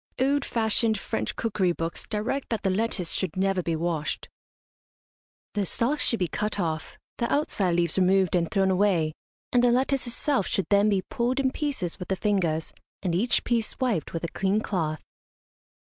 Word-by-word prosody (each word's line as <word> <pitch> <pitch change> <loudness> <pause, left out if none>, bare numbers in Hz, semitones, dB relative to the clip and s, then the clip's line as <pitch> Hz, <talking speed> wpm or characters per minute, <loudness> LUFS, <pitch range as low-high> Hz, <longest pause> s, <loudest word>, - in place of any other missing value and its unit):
Old 275 +2 +2
fashioned 220 -1 +1
French 110 - -3
cookery 195 -5 +1
books 165 0 -4
direct 220 +6 -2
that 225 -3 -2
the 190 - +2
lettuce 190 -3 -1
should 185 -3 -1
never 195 -1 +2
be 165 -1 -1
washed. 160 -2 -2 1.2
The 205 - 0
stalks 240 - +1
should 230 - +2
be 180 -3 0
cut 210 +4 -2
off, 160 -4 -2 0.2
the 235 - 0
outside 200 - +1
leaves 170 +1 +1
removed 190 -1 +3
and 170 -2 +1
thrown 195 -2 +2
away, 180 -5 +2 0.4
and 245 -1 +4
the 245 - +6
lettuce 260 +1 +1
itself 240 -2 0
should 195 - 0
then 200 +1 +5
be 195 -2 +1
pulled 245 +7 -1
in 265 -1 +2
pieces 265 - -3
with 180 - -6
the 190 - 0
fingers, 180 -6 0 0.3
and 180 -3 0
each 215 +8 +2
piece 230 -2 0
wiped 240 - 0
with 165 - -4
a - - 0
clean 195 +4 +1
cloth. 160 -8 -2
195 Hz, 175 wpm, -26 LUFS, 175-235 Hz, 1.2 s, the